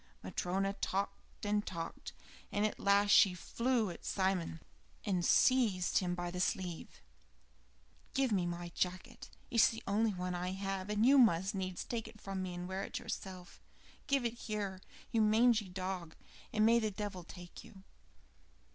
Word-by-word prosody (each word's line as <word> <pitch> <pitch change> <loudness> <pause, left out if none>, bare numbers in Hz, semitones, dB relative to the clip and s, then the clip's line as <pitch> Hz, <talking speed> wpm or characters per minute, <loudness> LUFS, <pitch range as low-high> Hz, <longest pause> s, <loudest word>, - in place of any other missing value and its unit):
Matryona 190 - -1
talked 200 +1 -4
and 205 0 +1
talked, 165 -4 -6 0.4
and 205 +1 +1
at 215 - -2
last 200 +1 +4
she 190 -3 +7
flew 230 +2 0
at - - -11
Simon 185 -4 0 0.5
and 185 -4 0
seized 220 -5 +4
him 180 -2 -1
by 175 -1 -3
the 180 - -4
sleeve. 180 - -3 1.1
"Give 270 -3 +2
me 185 -4 +1
my 175 0 -4
jacket. 180 +1 -3 0.2
It - - -5
is 225 - +8
the 225 - -7
only 215 +2 +2
one 180 0 -3
I 180 +1 -2
have, 195 0 -3
and 210 +2 +2
you 275 +2 +7
must 195 -4 +4
needs 185 -2 -3
take 230 -2 -4
it 215 - -13
from 195 -1 -4
me 185 -1 -4
and 175 0 -5
wear 190 +1 -3
it - - -4
yourself. 185 -2 -7 0.5
Give 275 -3 +2
it 235 - 0
here, 205 -5 -4 0.3
you 225 - +3
mangy 220 -1 +4
dog, 180 -2 -4 0.4
and 215 0 +3
may 230 +1 +6
the 215 -2 0
devil 205 -3 -5
take 175 0 -11
you." 190 -2 -15
195 Hz, 165 wpm, -34 LUFS, 180-215 Hz, 1.1 s, is